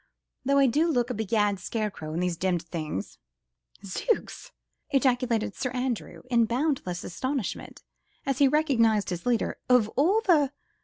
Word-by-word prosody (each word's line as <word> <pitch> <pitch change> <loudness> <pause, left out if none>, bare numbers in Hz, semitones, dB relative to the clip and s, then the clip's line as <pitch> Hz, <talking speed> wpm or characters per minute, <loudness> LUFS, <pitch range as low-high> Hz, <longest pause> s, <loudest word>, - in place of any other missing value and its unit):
though 275 +1 +2
I 275 - +6
do 295 +7 +2
look 250 -6 +1
a - - -1
begad 210 -2 0
scarecrow 200 -6 -4
in 165 +3 -2
these 180 -1 0
demmed 180 -1 0
things." 155 - -5 0.7
"Zooks!" 465 - -2 0.4
ejaculated 245 -5 +1
Sir 255 - -3
Andrew 250 -2 -3
in 235 -1 +4
boundless 235 - -1
astonishment 255 +6 -4 0.4
as 275 -1 -1
he 280 - +6
recognised 230 -9 +2
his 175 +5 -4
leader, 240 -2 0
"of 245 -4 +5
all 360 - +2
the 300 - +3
240 Hz, 145 wpm, -27 LUFS, 195-275 Hz, 0.7 s, I